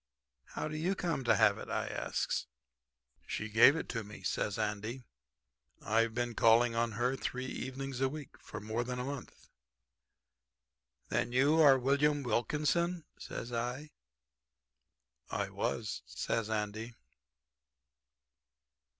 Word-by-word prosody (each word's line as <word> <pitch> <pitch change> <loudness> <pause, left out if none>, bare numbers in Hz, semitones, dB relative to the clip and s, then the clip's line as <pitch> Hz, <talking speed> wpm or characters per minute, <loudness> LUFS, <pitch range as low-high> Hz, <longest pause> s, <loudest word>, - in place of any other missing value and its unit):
"'How - - -2
do 155 - -5
you 175 +5 0
come 165 -7 -1
to - - +5
have 105 -2 +4
it?' - - -8
I - - -1
asks. - - -2 0.8
"'She 110 - -3
gave 115 +7 +7
it 160 - -3
to 115 -2 -2
me,' 105 -2 -11
says 100 +2 -1
Andy. 110 +4 -2 0.8
'I've 115 +1 +1
been 120 -1 -1
calling 115 +1 +5
on 115 0 0
her 125 +4 +1
three 130 -1 -3
evenings 130 0 -5
a 135 - +3
week 150 -1 -8
for 105 - -8
more 110 +3 -2
than 125 +1 -4
a 125 - -2
month.' 135 -2 -7 1.6
"'Then - - +1
are - - -11
you 135 +5 +4 0.2
William 140 +3 +2
Wilkinson?' 150 +8 0
says 120 +1 -6
I. 125 +6 -3 1.4
"'I - - -2
was,' - - -2
says 115 -2 -2
Andy." 110 +2 -3
120 Hz, 130 wpm, -33 LUFS, 110-140 Hz, 1.6 s, gave